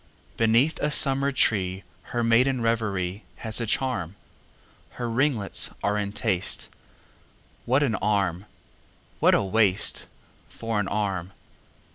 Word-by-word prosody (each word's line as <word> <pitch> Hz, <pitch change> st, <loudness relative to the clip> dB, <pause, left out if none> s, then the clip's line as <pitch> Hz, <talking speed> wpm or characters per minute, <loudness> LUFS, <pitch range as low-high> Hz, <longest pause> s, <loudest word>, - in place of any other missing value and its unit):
Beneath 115 Hz, +7 st, +2 dB
a 150 Hz, -, 0 dB
summer 140 Hz, -1 st, +4 dB
tree, 95 Hz, -7 st, +1 dB, 0.2 s
Her 120 Hz, -1 st, -2 dB
maiden 125 Hz, +3 st, +3 dB
reverieHas 110 Hz, 0 st, -2 dB
a 115 Hz, -, -3 dB
charm; 110 Hz, -8 st, -2 dB, 0.8 s
Her 120 Hz, -, -4 dB
ringlets 115 Hz, -3 st, 0 dB
are 105 Hz, -, +1 dB
in 100 Hz, -1 st, -2 dB
taste; 100 Hz, -4 st, 0 dB, 1.0 s
What 130 Hz, +4 st, +2 dB
an 130 Hz, -6 st, 0 dB
arm!… 100 Hz, -3 st, -1 dB, 0.7 s
what -, -, +4 dB
a -, -, +1 dB
waistFor 105 Hz, +2 st, -1 dB
an 100 Hz, -, -1 dB
arm! 95 Hz, -3 st, -3 dB
110 Hz, 110 wpm, -25 LUFS, 100-120 Hz, 1.0 s, summer